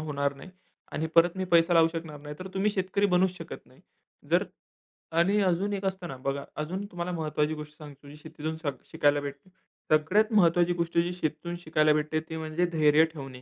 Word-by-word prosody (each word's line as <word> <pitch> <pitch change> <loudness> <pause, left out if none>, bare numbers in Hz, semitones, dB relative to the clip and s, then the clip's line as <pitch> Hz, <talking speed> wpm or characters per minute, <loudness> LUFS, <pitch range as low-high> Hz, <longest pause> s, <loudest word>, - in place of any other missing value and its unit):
होणार 140 -2 -1
नाही 140 +7 -12 0.4
आणि 160 - -1
परत 170 +2 +5
मी 190 - -1
पैसा 170 -1 +4
लावू 165 -1 +6
शकणार 160 -3 -6
नाही. 150 0 -8
तर 185 - -7
तुम्ही 195 +2 +2
शेतकरी 200 +1 0
बनूच 185 0 +2
शकत - - -9
नाही. - - -21 0.5
जर - - +4 0.8
आणि 195 +5 +3
अजून 190 +2 +1
एक 200 -1 -3
असतं 190 -2 -2
ना, 135 - -6
बघा 140 +2 -3 0.2
अजून 185 +6 -4
तुम्हाला 175 -2 -5
महत्वाची 155 -2 -1
गोष्ट 150 0 -10
सांगतो 145 -2 -12
जी 145 - -11
शेतीतून 155 +1 -6
शिका 155 -3 -2 0.2
शिकायला 145 0 +3
भेटते. 140 +5 -8 0.4
सगळ्यात 185 +9 +3
महत्त्वाची 175 -3 +4
गोष्ट 170 -1 -2
जी 175 +1 +2
शेतीतून 170 0 -3
शिकायला 155 -2 +3
भेटते 155 +1 0
ती 160 - -4
म्हणजे 160 +2 -1
धैर्य 155 -1 +5
ठेवणे. 135 -4 -9
160 Hz, 190 wpm, -28 LUFS, 150-180 Hz, 0.8 s, लावू